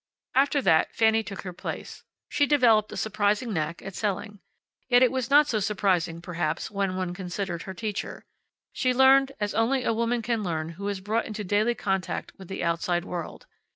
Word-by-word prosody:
After 280 +1 +3
that 160 0 +3
Fanny 225 0 +4
took 200 -3 -7
her 180 -2 -6
place. - - -7 0.3
She 285 - +1
developed 230 -7 +4
a - - -6
surprising 210 +2 0
knack 160 0 -3
at 195 - -7
selling. 205 +1 -3 0.5
Yet 245 0 +6
it 250 - +4
was 260 -2 -2
not 295 +2 +7
so 235 -7 0
surprising, 185 -5 0
perhaps, 165 -3 -2
when 195 -2 -1
one 185 -1 -2
considered 180 -1 -4
her 190 - -6
teacher. 210 +1 -5 0.5
She 255 -1 +1
learned 270 +1 +6
as 205 -1 -1
only 245 +4 +1
a 230 - +1
woman 235 +1 0
can 230 -1 0
learn 160 -4 -2
who 195 +5 -6
is 200 -2 -3
brought 215 +4 -1
into 215 -1 -5
daily 210 +5 +1
contact 190 -3 -2
with 190 - -10
the 190 - -4
outside 170 +1 0
world. 175 -3 -6
205 Hz, 190 wpm, -26 LUFS, 180-230 Hz, 0.5 s, not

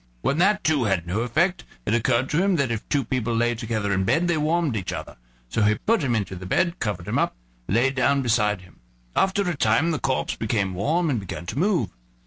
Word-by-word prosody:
When 140 - 0
that 205 +3 +3
too 150 -6 +2
had 95 -5 0
no 90 +5 -2
effect 170 +10 +1 0.2
it - - 0
occurred 120 +2 +2
to 160 - +2
him 195 -1 +2
that 140 -6 0
if 110 -2 -4
two 140 -4 +1
people 120 -1 -1
lay 120 +1 +2
together 110 -3 -2
in 95 0 +1
bed 165 - +2
they 175 - +2
warmed 155 -3 +1
each 100 -4 -3
other; - - -6 0.3
so 85 - -1
he 105 0 +4
put 225 - +1
him 125 -5 +1
into 100 -3 -2
the 95 0 -8
bed, 170 - +1
covered 100 -6 -3
him - - 0
up, - - 0 0.3
and 100 - 0
lay 130 +3 +3
down 135 +1 +2
beside 105 -5 +1
him; 90 -2 -19 0.4
after 195 0 +2
a 175 - 0
time 160 +4 +2
the 155 - -1
corpse 130 -1 -1
became 105 -4 -1
warm 155 - +1
and 125 - 0
began 95 -3 -7
to 110 +9 -4
move. 175 - +1
120 Hz, 235 wpm, -24 LUFS, 105-160 Hz, 0.4 s, he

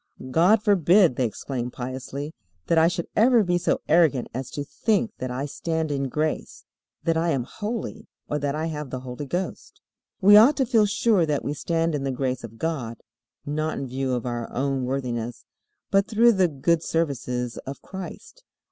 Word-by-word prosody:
"God 190 - +4
forbid," 185 - +4
they 130 - +1
exclaim 125 +2 -4
piously, 130 +4 -6 0.3
"that 165 - +3
I 160 - +5
should 170 -1 -2
ever 235 +1 +5
be 175 -2 +1
so 175 - 0
arrogant 155 -6 +3
as 130 +1 -4
to 145 - -4
think 220 +8 0
that 130 - -3
I 130 +3 -3
stand 160 +1 -2
in 135 -1 -1
grace, 155 +3 -3 0.4
that 165 -1 +1
I 170 +1 +1
am 135 -6 0
holy, 215 - -5 0.2
or 150 - -1
that 145 0 -1
I 155 +1 -2
have 150 -3 -4
the 130 0 -5
Holy 130 +3 -6
Ghost." 180 +6 -4 0.4
We 205 0 +7
ought 240 +8 +7
to 265 - +2
feel 225 -4 +3
sure 205 -4 +2
that 145 -2 -1
we 145 - -1
stand 165 +2 -1
in 145 -2 -2
the 135 - -1
grace 130 -1 -2
of 115 -1 -9
God, 125 -7 -3 0.5
not 155 +2 -2
in 140 - -3
view 130 0 -2
of 120 - -4
our 120 -1 -4
own 135 0 -1
worthiness, 125 -3 -3 0.5
but 195 0 +3
through 230 +2 +5
the 190 -4 +3
good 160 +2 +1
services 125 -7 -2
of 135 - -7
Christ. 190 - -9
150 Hz, 185 wpm, -25 LUFS, 130-180 Hz, 0.5 s, We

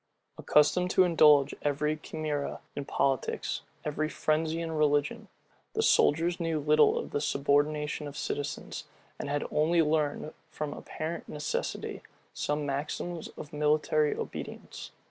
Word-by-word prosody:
Accustomed 180 +5 +3
to 185 - +5
indulge 150 -5 +5
every 150 +1 0
chimera 155 -2 -3
in 140 - -4
politics, 135 -1 0 0.2
every 155 +1 -1
frenzy 160 +1 0
in 165 -1 -3
religion, 145 -2 +1 0.5
the - - +1
soldiers 170 +4 +3
knew 165 -2 0
little 150 +1 +4
of - - -4
the 145 - -1
subordination 150 +1 +1
of 145 - -8
citizens, 145 +1 -4 0.3
and - - -4
had 145 0 -1
only 165 +2 +3
learned, 150 0 0 0.2
from 150 -1 -4
apparent 160 +2 -5
necessity, 150 0 -3 0.3
some 150 0 -1
maxims 155 +4 -3
of 150 - -9
military 150 0 +2
obedience. - - -7
150 Hz, 125 wpm, -29 LUFS, 145-155 Hz, 0.5 s, to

